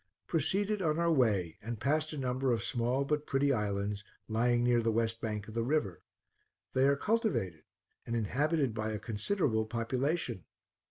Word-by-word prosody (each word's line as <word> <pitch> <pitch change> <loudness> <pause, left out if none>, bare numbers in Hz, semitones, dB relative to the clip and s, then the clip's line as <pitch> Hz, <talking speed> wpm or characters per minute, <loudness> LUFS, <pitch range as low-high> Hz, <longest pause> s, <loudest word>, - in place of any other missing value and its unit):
Proceeded 195 +6 0
on 155 -3 +1
our 170 0 +2
way, 105 - +2
and 115 +1 -5
passed 155 +4 +1
a 155 - -5
number 130 0 0
of 115 -3 0
small 125 +2 0
but 150 +1 -1
pretty 135 +1 +2
islands, 105 -2 -1 0.2
lying 120 +2 +2
near 120 -1 +4
the 115 0 +1
west 115 0 0
bank 105 -2 -3
of 110 - -9
the 115 - 0
river. 115 - 0 0.7
They 130 +1 +4
are 140 - +4
cultivated 160 - 0 0.4
and 115 - -1
inhabited 135 +4 +1
by 110 0 -2
a - - -1
considerable 110 - 0
population. 120 - -1
120 Hz, 165 wpm, -32 LUFS, 110-150 Hz, 0.7 s, near